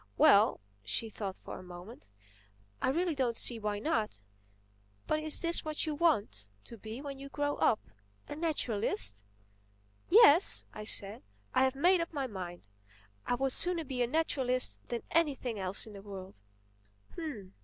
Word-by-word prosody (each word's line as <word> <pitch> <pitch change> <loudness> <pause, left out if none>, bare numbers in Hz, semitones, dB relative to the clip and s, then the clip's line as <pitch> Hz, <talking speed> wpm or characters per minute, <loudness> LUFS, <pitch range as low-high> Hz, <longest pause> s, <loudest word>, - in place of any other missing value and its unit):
"Well"—she 110 - +2
thought 195 -2 -6
a - - -8
moment—"I 105 - -10
really 340 +5 0
don't 250 -5 -1
see 235 -2 0
why 210 -1 -3
not. 215 - -2 0.8
But 310 - 0
is 310 0 +2
this 340 -1 +1
what 310 +1 -2
you 310 - -2
want 285 - 0 0.2
to 235 - -10
be 220 +5 -8
when 275 -2 -7
you 275 0 -9
grow 290 0 -2
up, 215 - +2 0.5
a - - -7
naturalist?" 215 - +1 0.9
"Yes," 360 -4 +8
I 215 - -8
said, 200 -1 0 0.3
"I 260 - +3
have 260 0 -1
made 350 +5 +3
up 335 - -5
my 280 -3 -2
mind. 185 -6 -8 0.6
I 245 - +1
would 265 +2 -1
sooner 350 +3 +3
be 260 -4 -4
a 240 - +2
naturalist 255 -4 +1
than 240 -1 -4
anything 270 -9 0
else 190 0 -3
in 215 - -12
the 200 - -10
world." 190 - -10
235 Hz, 150 wpm, -31 LUFS, 195-295 Hz, 0.9 s, Yes